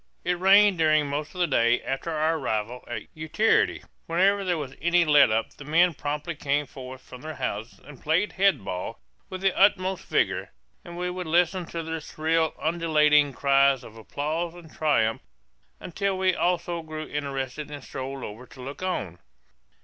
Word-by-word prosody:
It 180 Hz, -1 st, 0 dB
rained 195 Hz, 0 st, +6 dB
during 155 Hz, -2 st, +4 dB
most 145 Hz, +4 st, -4 dB
of 180 Hz, -, -3 dB
the -, -, +5 dB
day 120 Hz, -6 st, +3 dB
after 135 Hz, +5 st, -3 dB
our 160 Hz, 0 st, +1 dB
arrival 110 Hz, +2 st, -3 dB
at 110 Hz, -3 st, -5 dB
Utiarity. 160 Hz, +8 st, +1 dB, 0.2 s
Whenever 195 Hz, +4 st, +2 dB
there 180 Hz, -3 st, 0 dB
was 140 Hz, -4 st, -5 dB
any 175 Hz, +1 st, +3 dB
let 150 Hz, -4 st, +6 dB
up 110 Hz, +1 st, 0 dB
the -, -, -12 dB
men 170 Hz, +4 st, +3 dB
promptly 150 Hz, +3 st, -4 dB
came 145 Hz, 0 st, -1 dB
forth 130 Hz, -1 st, -10 dB
from 125 Hz, -, -12 dB
their 155 Hz, +1 st, -7 dB
houses 115 Hz, -3 st, -4 dB
and 145 Hz, -3 st, -13 dB
played 165 Hz, +7 st, +1 dB
head 195 Hz, -, +2 dB
ball 95 Hz, +4 st, -5 dB, 0.3 s
with 185 Hz, 0 st, -6 dB
the 195 Hz, -1 st, +2 dB
utmost 190 Hz, -1 st, +2 dB
vigor; -, -, 0 dB, 0.3 s
and 175 Hz, -3 st, -9 dB
we 180 Hz, 0 st, -2 dB
would 180 Hz, -1 st, -5 dB
listen 175 Hz, +2 st, +2 dB
to 165 Hz, -1 st, -5 dB
their 160 Hz, 0 st, -4 dB
shrill 160 Hz, +1 st, 0 dB
undulating 150 Hz, -3 st, +3 dB
cries 140 Hz, -1 st, +3 dB
of 110 Hz, -, -12 dB
applause 155 Hz, +9 st, -3 dB
and 165 Hz, -3 st, -13 dB
triumph 115 Hz, -8 st, +1 dB, 0.6 s
until 195 Hz, +2 st, -2 dB
we 185 Hz, 0 st, +2 dB
also 175 Hz, -1 st, -1 dB
grew 155 Hz, -1 st, -7 dB
interested 140 Hz, 0 st, -4 dB
and 145 Hz, -2 st, -8 dB
strolled 135 Hz, 0 st, -6 dB
over 115 Hz, +5 st, -8 dB
to 130 Hz, -, -16 dB
look 135 Hz, +5 st, -8 dB
on. 100 Hz, -, -3 dB
155 Hz, 175 wpm, -26 LUFS, 135-175 Hz, 0.6 s, rained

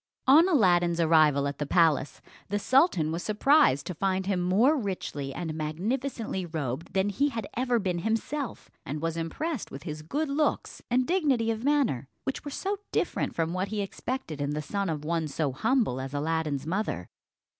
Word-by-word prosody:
On 315 Hz, +7 st, +7 dB
Aladdin's 175 Hz, -, +3 dB
arrival 155 Hz, -4 st, +4 dB
at 140 Hz, 0 st, -5 dB
the 145 Hz, -, -1 dB
palace, 160 Hz, -4 st, +2 dB, 0.3 s
the 205 Hz, -, 0 dB
sultan 205 Hz, -, +3 dB
was 165 Hz, +2 st, -2 dB
surprised 215 Hz, -, +3 dB
to 180 Hz, -, -4 dB
find 190 Hz, +2 st, -1 dB
him 190 Hz, -2 st, 0 dB
more 210 Hz, -, +4 dB
richly 185 Hz, -, -3 dB
and 160 Hz, +2 st, -4 dB
magnificently 195 Hz, -, -2 dB
robed 155 Hz, -4 st, -4 dB
than 195 Hz, +1 st, +2 dB
he 280 Hz, +9 st, +1 dB
had 225 Hz, -6 st, -4 dB
ever 245 Hz, 0 st, +1 dB
been 185 Hz, -5 st, -1 dB
himself, 225 Hz, -, -3 dB
and 150 Hz, +3 st, -4 dB
was 165 Hz, +1 st, -2 dB
impressed 225 Hz, -, -3 dB
with 135 Hz, +1 st, -9 dB
his 150 Hz, 0 st, -5 dB
good 290 Hz, -, -2 dB
looks 295 Hz, +2 st, -1 dB
and 250 Hz, +1 st, +2 dB
dignity 280 Hz, -10 st, +2 dB
of 225 Hz, +1 st, -4 dB
manner, 270 Hz, -, +1 dB, 0.2 s
which 270 Hz, -, -3 dB
were 290 Hz, -, -5 dB
so 395 Hz, +8 st, -2 dB
different -, -, -1 dB
from 165 Hz, 0 st, -1 dB
what 185 Hz, +2 st, -1 dB
he 210 Hz, +1 st, -3 dB
expected 200 Hz, -, -4 dB
in 145 Hz, +1 st, -1 dB
the 150 Hz, -, -2 dB
son 200 Hz, +3 st, -2 dB
of 150 Hz, -2 st, -3 dB
one 165 Hz, -1 st, 0 dB
so 145 Hz, -1 st, -1 dB
humble 200 Hz, -, +1 dB
as 135 Hz, +2 st, -6 dB
Aladdin's 150 Hz, -2 st, -1 dB
mother. 165 Hz, -, -2 dB
185 Hz, 180 wpm, -28 LUFS, 155-250 Hz, 0.3 s, On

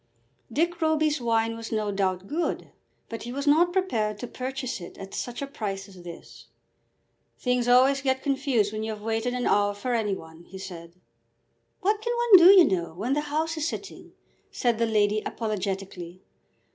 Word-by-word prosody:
Dick 335 Hz, +6 st, 0 dB
Roby's 310 Hz, -2 st, +2 dB
wine 230 Hz, -1 st, +1 dB
was 230 Hz, 0 st, -8 dB
no 215 Hz, -2 st, -1 dB
doubt 190 Hz, -2 st, -1 dB
good, 325 Hz, -, -3 dB, 0.4 s
but 230 Hz, -, -7 dB
he 240 Hz, -, -6 dB
was 280 Hz, +3 st, -4 dB
not 325 Hz, +4 st, +4 dB
prepared 225 Hz, -, 0 dB
to 245 Hz, -, -6 dB
purchase 255 Hz, -2 st, -5 dB
it 175 Hz, -, -10 dB
at 195 Hz, 0 st, -9 dB
such 245 Hz, +2 st, -4 dB
a -, -, -1 dB
price 205 Hz, -8 st, -5 dB
as 190 Hz, -2 st, -14 dB
this. 170 Hz, -1 st, -11 dB, 0.9 s
"Things 250 Hz, -1 st, 0 dB
always 260 Hz, +3 st, +5 dB
get 265 Hz, -1 st, 0 dB
confused 265 Hz, -7 st, +1 dB
when 215 Hz, -, -3 dB
you 220 Hz, 0 st, -3 dB
have 210 Hz, -1 st, -10 dB
waited 225 Hz, +2 st, -1 dB
an 250 Hz, -, -2 dB
hour 205 Hz, 0 st, +2 dB
for 245 Hz, +5 st, -3 dB
any 215 Hz, -4 st, 0 dB
one," 160 Hz, -1 st, -12 dB
he 190 Hz, -, -11 dB
said. 175 Hz, -3 st, -9 dB, 0.9 s
"What 415 Hz, +3 st, +1 dB
can 475 Hz, +2 st, -1 dB
one 475 Hz, -5 st, +8 dB
do, -, -, +11 dB
you 375 Hz, -4 st, +8 dB
know, 170 Hz, -, -1 dB
when 230 Hz, +9 st, -1 dB
the 295 Hz, -, +1 dB
House 315 Hz, +2 st, -2 dB
is 315 Hz, 0 st, -1 dB
sitting?" -, -, -7 dB, 0.4 s
said 235 Hz, -2 st, 0 dB
the 230 Hz, -, +2 dB
lady 210 Hz, -1 st, +2 dB
apologetically. 190 Hz, -5 st, -4 dB
230 Hz, 185 wpm, -26 LUFS, 200-280 Hz, 0.9 s, do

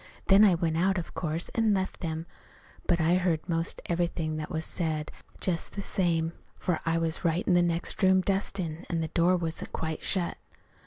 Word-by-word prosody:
Then 195 Hz, +2 st, +8 dB
I 195 Hz, -4 st, +6 dB
went 165 Hz, -1 st, 0 dB
out, 190 Hz, +2 st, +2 dB
of 170 Hz, -, -5 dB
course, 165 Hz, 0 st, -2 dB
an' 225 Hz, -3 st, +2 dB
left 190 Hz, 0 st, -2 dB
them. 160 Hz, -2 st, -3 dB, 0.6 s
But 175 Hz, -, +3 dB
I 165 Hz, +1 st, +3 dB
heard 175 Hz, -3 st, 0 dB
'most 165 Hz, -1 st, -2 dB
everything 170 Hz, -2 st, -1 dB
that 155 Hz, -1 st, -4 dB
was 160 Hz, 0 st, -2 dB
said, 155 Hz, -3 st, -2 dB, 0.3 s
just 170 Hz, -3 st, -1 dB
the 200 Hz, -, -4 dB
same, 165 Hz, -4 st, +1 dB, 0.2 s
for 175 Hz, -3 st, -1 dB
I 165 Hz, 0 st, +2 dB
was 165 Hz, -1 st, -1 dB
right 170 Hz, +1 st, +1 dB
in 185 Hz, -, +4 dB
the 175 Hz, -, +5 dB
next 170 Hz, +2 st, -1 dB
room 190 Hz, -1 st, +5 dB
dustin', 185 Hz, -4 st, -1 dB
and 165 Hz, -2 st, 0 dB
the 160 Hz, -, -3 dB
door 175 Hz, +3 st, +3 dB
wasn't 165 Hz, -2 st, -4 dB
quite 160 Hz, -1 st, -3 dB
shut. 180 Hz, -3 st, 0 dB
170 Hz, 195 wpm, -28 LUFS, 160-185 Hz, 0.6 s, Then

